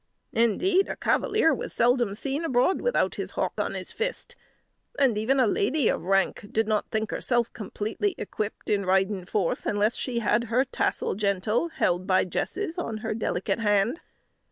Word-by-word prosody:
Indeed, 360 - +2
a - - -3
cavalier 415 -6 +2
was - - -4
seldom 240 -4 +2
seen 275 +7 -2
abroad 260 +3 +2
without - - +1
his - - -5
hawk - - 0
on - - -1
his - - -5
fist; 485 +1 -3 0.6
and 260 -5 +3
even 235 +6 +1
a 255 - +5
lady 235 +6 +1
of - - 0
rank 195 +3 +1
did 225 0 +1
not 215 -1 0
think 220 -1 -2
herself 240 -2 0
completely 225 - -3
equipped, 215 0 -5
in 205 -1 +2
riding 190 0 +1
forth, 190 -5 -1
unless 210 +2 +1
she 250 -3 -3
had 235 0 +1
her 240 +4 +2
tassel 255 - -1
gentel 205 - 0
held 180 - 0
by 185 -1 +4
jesses 345 - -3
on 230 -10 -3
her 220 - -1
delicate 210 -1 -1
hand. 210 - +1
225 Hz, 170 wpm, -26 LUFS, 205-270 Hz, 0.6 s, a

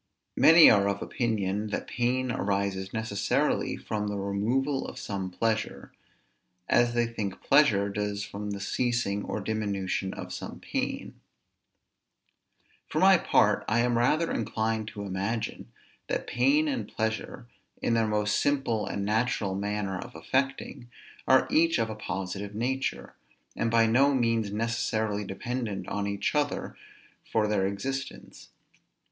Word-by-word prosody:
Many 165 +1 +8
are 100 -1 +5
of 100 0 -2
opinion, 105 -3 -1
that 105 - -3
pain 125 +1 0
arises 100 -2 -1
necessarily 110 -3 0
from 105 -1 -3
the 105 0 -3
removal 120 +8 0
of - - -9
some 95 -2 -4
pleasure; 110 +4 -2 0.8
as 120 0 +3
they 120 0 +3
think 110 -5 -4
pleasure 115 -9 +4
does 105 0 -2
from 105 0 -6
the 100 -1 -4
ceasing 115 -1 -1
or - - -3
diminution 100 -2 -2
of - - -7
some - - -7
pain. - - -4 1.7
For - - -4
my - - +6
part, - - +3
I 115 +2 +2
am 120 0 +1
rather 150 +8 +2
inclined 110 -1 -1
to 105 -2 -6
imagine, 100 +4 -3 0.4
that - - -2
pain 300 +3 +2
and 275 -3 -2
pleasure, 110 +1 -3 0.3
in 115 - 0
their 115 -1 +2
most 105 -1 +1
simple 135 -7 0
and 100 -1 -3
natural 105 -2 0
manner 100 -1 -2
of - - -9
affecting, 130 - -2 0.4
are 130 0 +5
each 165 +1 +4
of 115 -2 0
a - - -5
positive 100 0 -5
nature, 130 +4 -2 0.4
and 115 - 0
by 115 0 +4
no 135 +5 +4
means 115 -4 +1
necessarily 110 -1 -1
dependent 105 -2 -4
on 100 0 -2
each 100 0 -1
other 145 -1 -1 0.6
for 110 -1 +2
their 100 -2 +1
existence. 135 +7 -5
110 Hz, 140 wpm, -28 LUFS, 100-120 Hz, 1.7 s, Many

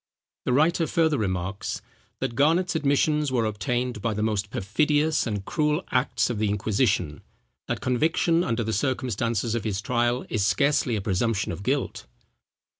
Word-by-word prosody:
The 125 - +1
writer 160 +4 +3
further 160 -3 +2
remarks,—"that 95 +3 -4
Garnet's 165 +8 +2
admissions 150 -1 +2
were 120 -3 +1
obtained 115 +3 -2
by 110 0 -1
the 105 - -1
most 105 -2 -1
perfidious 150 +11 +1
and 105 -3 -3
cruel 150 +1 0
acts 125 +1 +1
of 110 - -3
the 105 -1 +1
inquisition; 105 - 0 0.5
that - - -2
conviction 160 +6 +2
under 115 -4 -1
the 110 0 -2
circumstances 115 -2 -1
of 115 -3 -1
his 105 -3 -2
trial, 120 +3 0
is 110 -4 -1
scarcely 140 +1 +2
a 105 - -2
presumption 100 +1 0
of 85 - -6
guilt." 130 +4 -2
120 Hz, 150 wpm, -25 LUFS, 105-145 Hz, 0.5 s, writer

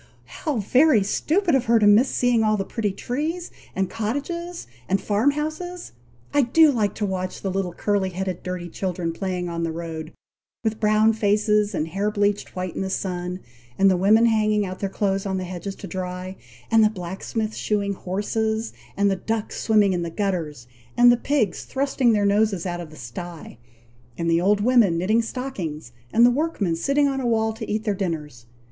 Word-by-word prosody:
"How 300 -6 -3
very 250 +2 +4
stupid 335 - +1
of 265 -2 +2
her 230 +1 +4
to 215 - +3
miss 215 +6 +6
seeing 245 -2 +2
all 215 0 +2
the 195 - -2
pretty 220 -1 -2
trees, 310 - -3 0.2
and 190 0 0
cottages, 290 - -4 0.2
and 195 - +2
farm 210 +7 +2
houses! 315 +5 -4 0.4
I 290 - +5
do 300 +5 +5
like 215 -6 0
to 210 - -1
watch 185 -1 -4
the 195 - -1
little 190 -1 -1
curly 200 +1 0
headed, 185 0 -4
dirty 180 -1 -5
children, 175 -1 -3
playing 180 -1 -3
on 170 -1 -3
the 165 -1 -1
road, 160 -1 -6 0.5
with 220 -1 -1
brown 215 +1 +4
faces, 210 -1 +2
and 155 - -1
hair 195 +5 -1
bleached 205 -1 -1
white 185 -1 -3
in - - -3
the 190 - -2
sun; 180 -1 -3 0.4
and 195 0 +5
the - - +3
women 210 +5 +5
hanging 215 -2 +2
out 185 0 -6
their 195 - -2
clothes 195 0 -1
on 190 -1 -1
the 185 - -3
hedges 185 +2 -6
to - - -9
dry; 185 +1 -5 0.4
and 225 -1 +6
the 215 - +5
blacksmith 210 +3 -4
shoeing 200 -1 -1
horses, 220 +4 -2 0.2
and 200 0 +3
the - - +1
ducks 220 +3 -3
swimming 210 -3 +3
in 175 - -1
the 170 - -3
gutters, 165 - -3 0.3
and 240 0 +8
the - - +5
pigs 240 -4 0
thrusting 270 -2 +1
their 205 -2 +2
noses 200 -3 +2
out 175 -1 -3
of 165 - -8
the 155 - -13
sty, 150 +2 -8 0.6
and 170 0 0
the 165 +1 +3
old 205 +2 +3
women 225 -7 +4
knitting 215 +7 +2
stockings, 190 - -5 0.2
and 235 +1 +6
the 245 - +6
workmen 245 - 0
sitting 280 - +2
on 270 -1 -1
a 245 - -1
wall 220 -1 +1
to 220 - -7
eat 215 +1 -1
their 210 - 0
dinners! 150 -10 -4
205 Hz, 195 wpm, -23 LUFS, 185-225 Hz, 0.6 s, and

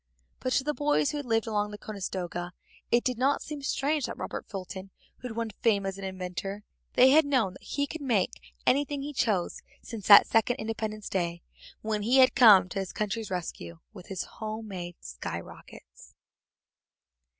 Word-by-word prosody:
But 255 - -2
to 265 - +2
the 300 +2 -1
boys 290 0 +1
who 300 - -3
had 290 -3 -5
lived 225 -1 +2
along 210 -2 -1
the 210 - -8
Conestoga 180 -4 -5 0.4
it 240 +1 +3
did 250 -2 -1
not 275 +2 +2
seem 295 -1 -6
strange 280 +1 0
that - - -6
Robert - - -5
Fulton 190 -1 -7 0.3
had 250 -2 -5
won 230 -1 -3
fame 200 -1 +1
as 195 0 -4
an - - -7
inventor; 190 +2 -5 0.3
they 260 +1 +7
had 310 +3 +7
known 255 -10 +1
he 285 - -2
could 320 +2 -7
make 180 - -1
anything 285 +1 +1
he 295 +1 -5
chose 210 -9 0 0.2
since 220 -5 -7
that 200 - +10
second 225 +2 +2
Independence 220 -2 -4
Day 175 -2 -2 0.4
when 215 -1 -1
he 240 +6 +3
had 260 -1 +7
come 215 -8 +8
to 195 - -3
his 190 -1 -4
country's 215 +1 -2
rescue 160 - -5 0.2
with 185 -4 -12
his 190 -2 -3
home 220 0 -6
made 175 -3 -6
sky - - -5
rockets. - - -14
215 Hz, 180 wpm, -28 LUFS, 190-255 Hz, 0.4 s, that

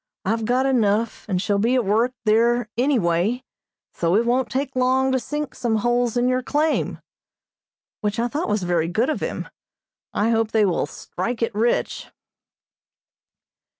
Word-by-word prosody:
I've 225 +3 0
got 250 +3 +2
enough, 230 -4 +1
and 185 -2 +1
shall 200 +1 0
be 235 +5 +2
at 250 -4 +1
work 230 +6 +1
there 235 +2 +3
any 260 +4 +2
way, 185 +6 0 0.5
so 170 +1 +1
it 230 +3 +3
won't 245 +1 +1
take 270 0 -2
long 260 +1 +2
to 260 - +2
sink 295 +2 -4
some 235 -3 -1
holes 240 +2 +1
in 245 +1 +2
your 255 0 +1
claim," 300 +4 0 1.0
which 210 -1 -2
I 235 +1 +1
thought 295 +5 -3
was 210 -2 0
very 175 -2 +1
good 225 - +1
of - - -2
him. - - -4 0.6
I 220 +3 +1
hope 225 -1 +1
they 220 -2 +4
will 175 -5 0
"strike 230 +10 -4
it" 230 - -1
rich. 225 +3 0
235 Hz, 165 wpm, -22 LUFS, 210-255 Hz, 1.0 s, they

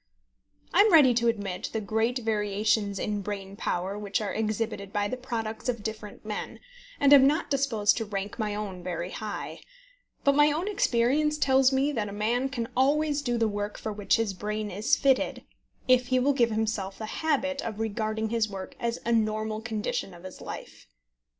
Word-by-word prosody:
I 355 - +4
am 425 0 +5
ready 290 -7 +7
to 235 0 +1
admit 200 -5 -2
the 220 - 0
great 220 +4 0
variations 210 -2 0
in 205 +1 -2
brain 195 -1 -5
power 195 +1 -2
which 205 -1 -1
are 210 -2 -3
exhibited 215 -2 -2
by 205 0 0
the 255 - -3
products 235 -3 -4
of 235 -4 -2
different 215 -1 -6
men, 210 -1 -5 0.4
and 285 0 +6
am 270 -1 +8
not 300 +1 0
disposed 250 -7 +2
to 225 - -2
rank 200 +1 -5
my 210 -2 -1
own 200 -4 -5
very 175 0 -4
high; 215 -1 -5 0.6
but 280 - +4
my 295 +1 +5
own 325 +6 -2
experience 300 - +2
tells 265 -2 +4
me 270 +2 +2
that 215 -7 -2
a - - -7
man 235 +6 0
can 235 -3 -3
always 290 +3 +2
do 240 -4 -1
the 225 -1 +2
work 205 0 -3
for 215 - -4
which 205 -1 +2
his 225 -3 0
brain 210 +2 -3
is 205 +4 +2
fitted 270 -2 +1 0.4
if 255 -1 +4
he 255 0 +2
will 270 +3 +3
give 240 -3 +3
himself 215 -3 -2
the 220 - -5 0.2
habit 280 -3 0
of 220 -2 -5
regarding 220 0 -2
his 225 -1 +1
work 190 -2 -7
as 235 -1 -1
a 235 - 0
normal 215 -1 0
condition 215 -4 -3
of 170 - -14
his 185 - -10
life. - - -9
220 Hz, 190 wpm, -27 LUFS, 205-255 Hz, 0.6 s, am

